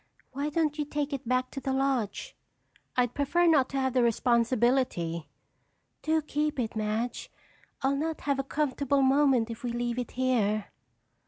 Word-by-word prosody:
Why 280 +3 -2
don't 305 -1 0
you 295 - 0
take 295 0 -3
it 265 -4 -5
back 255 +1 0
to - - -5
the 270 - -3
lodge?" 265 -6 -1 0.6
"I'd 245 -1 +2
prefer 315 +5 +2
not 300 -6 +4
to 275 - -2
have 260 -1 0
the 255 - +3
responsibility." 235 -7 +1 0.7
"Do 315 0 +1
keep 300 -1 -1
it, 225 -2 -2
Madge. 215 +3 -2 0.5
I'll 270 +1 +2
not 320 +2 -2
have 280 -1 0
a - - 0
comfortable 280 -1 0
moment 265 -4 +3
if 225 - -9
we 245 - -2
leave 240 0 -2
it 245 - -5
here." 215 -5 +1
260 Hz, 165 wpm, -28 LUFS, 235-285 Hz, 0.7 s, not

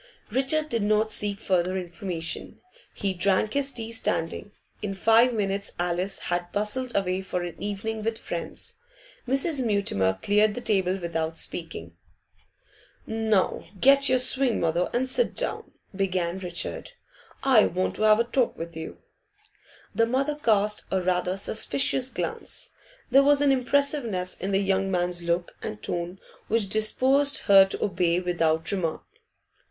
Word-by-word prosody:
Richard 275 +5 +1
did 230 -5 -1
not 215 +1 +2
seek 205 -2 -1
further 185 -2 0
information. 175 -2 -5 0.4
He 195 -1 -1
drank 195 +3 +1
his 280 -1 0
tea 230 -3 -5
standing. 205 -2 -2 0.3
In 195 -2 -3
five 225 +5 +5
minutes 200 -3 -2
Alice 180 +2 -1 0.2
had 175 0 -2
bustled 235 +5 -1
away 190 -1 0
for 180 -2 -3
an 175 -2 -7
evening 210 +2 -3
with 225 +1 -2
friends. - - -6 0.5
Mrs. 275 +2 0
Mutimer 145 - +1
cleared 210 +1 +3
the - - -3
table 190 -4 +1
without 165 -2 -3
speaking. 85 - -6 1.1
'Now 220 -3 0
get 275 +3 +5
your 255 - +4
sewing, 255 -1 +2
mother, 170 +2 0
and 255 +2 0
sit 475 - +1
down,' - - -4 0.2
began 185 -2 -1
Richard. 175 -2 -6 0.5
'I 255 -6 +5
want 185 +2 -1
to - - -5
have 215 0 +5
a - - +4
talk 240 +1 0
with 165 0 -7
you.' 160 - -7 1.0
The 230 0 +2
mother 270 +5 0
cast 210 -7 +1
a 190 - +1
rather 180 0 0
suspicious 255 +5 +1
glance. - - -5 0.4
There 270 +2 +7
was 285 0 +4
an 285 -1 +4
impressiveness 255 -8 +1
in 195 +2 -4
the 195 - +3
young 195 0 +1
man's 175 -1 0
look 170 +1 -1
and 105 - -5
tone 175 +2 -3 0.3
which 215 -3 +1
disposed 265 +7 +3
her 195 -1 +8
to 195 - -3
obey 180 -3 +1
without 165 -3 0
remark. 175 -5 -2
200 Hz, 145 wpm, -26 LUFS, 180-235 Hz, 1.1 s, her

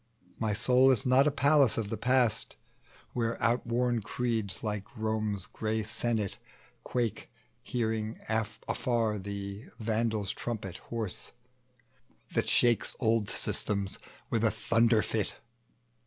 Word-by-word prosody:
My 110 -2 +1
soul 125 +4 +5
is 125 -6 +5
not 130 +3 +5
a - - +3
palace 140 -2 +4
of 110 -3 -2
the - - 0
past, 125 -3 +2 0.6
Where 115 -1 -1
outworn 120 0 +1
creeds, 115 -3 -2
like 105 +2 -4
Rome's 110 -3 -1
gray 110 0 -2
senate 110 -1 -1 0.4
quake, 120 -4 -2 0.3
Hearing 110 -2 -2
afar 110 0 -1
the 100 +3 -6
Vandal's 110 -2 0
trumpet 105 -6 -5
hoarse, 115 -5 -4 1.0
That - - +1
shakes 120 -3 +3
old 115 -3 +2
systems 100 -2 0 0.3
with 115 -1 +1
a 115 - +5
thunder 115 0 +3
fit. 110 -2 -1
110 Hz, 115 wpm, -30 LUFS, 105-120 Hz, 1.0 s, soul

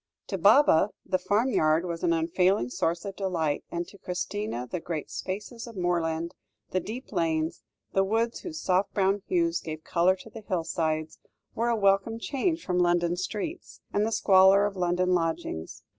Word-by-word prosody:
To 195 - -2
Baba, 205 - +6 0.2
the 185 -1 0
farmyard 195 -8 +2
was 170 -1 -4
an 175 - +3
unfailing 165 -3 +2
source 170 +6 -1
of 195 -1 -5
delight; 165 -7 -1
and 170 0 -3
to 200 - -15
Christina, 180 - -3
the 175 +8 -4
great 160 -2 -5
spaces 210 +5 -5
of 230 - -10
moorland, 170 -2 -1 0.4
the 185 - +1
deep 225 +8 -7
lanes, 160 -1 0 0.3
the 195 - +3
woods 225 +4 0
whose 320 -3 -6
soft 185 -3 +1
brown 195 0 +2
hues 335 -2 +1
gave 155 -1 -6
colour 175 +2 +3
to 215 +4 -13
the 225 - -9
hillsides, 160 -5 -2 0.3
were 235 +2 0
a 235 - +2
welcome 200 +2 +2
change 310 +7 -1
from 180 -1 0
London 175 -1 +2
streets, 210 - -5
and 205 - +2
the 220 - 0
squalor 195 -1 +6
of 205 -1 -2
London 180 0 +1
lodgings. 165 - -2
185 Hz, 170 wpm, -27 LUFS, 170-210 Hz, 0.4 s, Baba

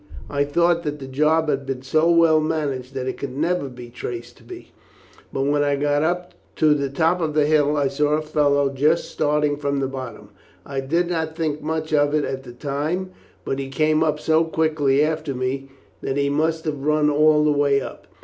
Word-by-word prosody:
I 145 0 +1
thought 170 +3 +2
that 150 -3 -4
the 135 - -8
job 155 +4 +1
had 140 -2 0
been 135 -1 -4
so 155 +5 +2
well 165 -2 +5
managed 140 -5 -3
that 130 -1 -3
it 130 - -3
could 135 -1 -5
never 165 -2 0
be 125 -1 -11
traced 120 0 -7
to - - -19
me, 365 -1 -11 0.6
but 135 - -1
when 145 +1 +2
I 145 0 +1
got 145 +1 +1
up 175 +3 -1 0.2
to 155 -1 +4
the 140 -2 -1
top 165 +6 +1
of 155 -2 -2
the 150 -1 +4
hill 150 -1 +2
I 140 -1 +2
saw 145 +2 0
a 155 - +1
fellow 145 -2 +2
just 150 +5 +1
starting 150 0 +1
from 140 -1 -1
the 135 - 0
bottom. 130 -6 -8 0.4
I 140 -1 -4
did 165 +6 0
not 160 -2 -2
think 155 -3 -2
much 155 +1 -3
of 145 0 +3
it 150 - +1
at 135 0 -4
the 125 -2 -11
time, 150 +8 -3 0.3
but 135 - -2
he 135 -1 -4
came 155 +2 +1
up 155 -1 +1
so 160 +1 +3
quickly 155 -3 +1
after 155 -3 -3
me 130 +2 -3 0.3
that 135 - -2
he 140 0 +1
must 160 +2 0
have 145 -3 -3
run 150 0 +2
all 150 +1 +4
the 150 - +3
way 140 -1 +2
up. - - -9
150 Hz, 215 wpm, -22 LUFS, 140-155 Hz, 0.6 s, well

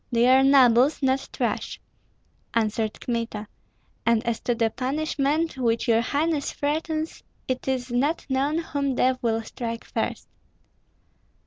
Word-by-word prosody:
"They 235 0 +3
are 260 +1 +6
nobles, 270 0 +5
not 265 0 +1
trash," - - -2 0.8
answered 220 -1 0
Kmita; 230 -3 -3 0.6
"and 230 0 +2
as 235 -1 -1
to 240 - -1
the 225 -1 +1
punishment 290 +3 -1
which 230 0 +1
your 230 -1 +4
highness 290 +3 0
threatens, 310 +2 -2 0.3
it 255 0 -3
is 255 -2 -1
not 285 +7 0
known 275 +3 0
whom 280 -5 -1
death 255 +1 +2
will 225 -1 0
strike 230 0 -5
first." - - -3
255 Hz, 130 wpm, -25 LUFS, 230-285 Hz, 0.8 s, are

